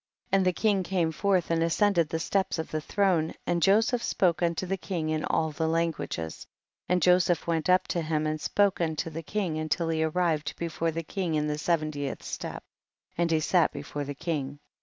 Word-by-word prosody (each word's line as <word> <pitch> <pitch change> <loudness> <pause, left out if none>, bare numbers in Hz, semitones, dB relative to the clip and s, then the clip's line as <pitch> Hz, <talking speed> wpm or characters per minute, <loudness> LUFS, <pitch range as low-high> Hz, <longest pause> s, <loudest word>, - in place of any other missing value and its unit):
17. - - +4
And 190 -1 +3
the 180 - 0
king 205 -3 +3
came 175 -3 0
forth 185 0 +1
and 165 0 +2
ascended 170 0 +2
the 160 - -1
steps 190 +4 0
of 160 - -4
the 155 - -2
throne, 175 -3 +1
and 175 -1 0
Joseph 225 +6 +3
spoke 180 -7 +1
unto 170 +1 0
the 190 +1 -1
king 175 -4 -3
in 155 0 -1
all 160 -1 0
languages, 160 - -2 0.4
and 180 -2 +2
Joseph 180 -2 +3
went 165 0 0
up 185 0 +4
to 170 - 0
him 155 -1 -1
and 155 0 -2
spoke 200 +1 +2
unto 160 0 -1
the 165 +1 -5
king 170 -2 -2
until 155 +2 -1
he 160 -1 0
arrived 160 -2 0
before 165 0 -2
the 165 +1 -3
king 175 -1 -2
in 150 0 +1
the 150 0 -2
se 170 +2 +3
ventieth 145 -3 -4
step, - - -6 0.5
and 170 0 +1
he 160 -1 +3
sat 170 +1 +3
before 145 - -5
the 140 0 -6
king. 145 -3 -3
165 Hz, 200 wpm, -28 LUFS, 155-180 Hz, 0.5 s, 17